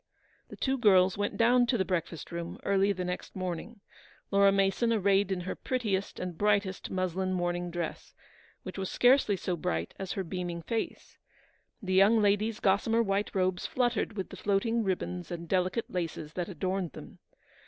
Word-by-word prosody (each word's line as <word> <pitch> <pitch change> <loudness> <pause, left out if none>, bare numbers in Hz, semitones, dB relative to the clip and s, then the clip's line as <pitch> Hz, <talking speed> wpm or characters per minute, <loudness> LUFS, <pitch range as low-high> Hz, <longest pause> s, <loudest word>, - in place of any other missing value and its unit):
The - - -9
two 265 0 -1
girls 190 -5 +5
went 205 0 -2
down 245 +1 +4
to 240 - +2
the 190 - +1
breakfast 170 -3 -3
room 170 0 -5
early 200 0 +3
the 185 -2 -3
next 180 0 -5
morning, 185 +4 -5 0.5
Laura 200 0 +5
Mason 195 +4 +2
arrayed 200 -2 +2
in 185 -2 -1
her 180 - -3
prettiest 210 -7 -2
and 180 -2 -4
brightest 200 -2 +1
muslin 185 0 -1
morning 175 -1 -1
dress, 170 -1 -5 0.5
which - - -7
was 190 - -2
scarcely 245 -4 +4
so 180 0 -2
bright 85 - -2
as 190 -1 -3
her 195 - -2
beaming 175 -1 -4
face. 225 +6 -4 0.6
The 185 -1 -1
young 200 +4 +6
lady's 210 +1 +2
gossamer 220 +4 +2
white 200 0 -1
robes 185 -1 0
fluttered 240 -4 0
with 190 - -3
the - - -9
floating 225 +3 +1
ribbons 180 -2 -3
and 170 -1 -6
delicate 185 +5 0
laces 165 -4 -4
that 180 0 -3
adorned 185 0 -2
them. - - -11
190 Hz, 170 wpm, -30 LUFS, 180-210 Hz, 0.6 s, young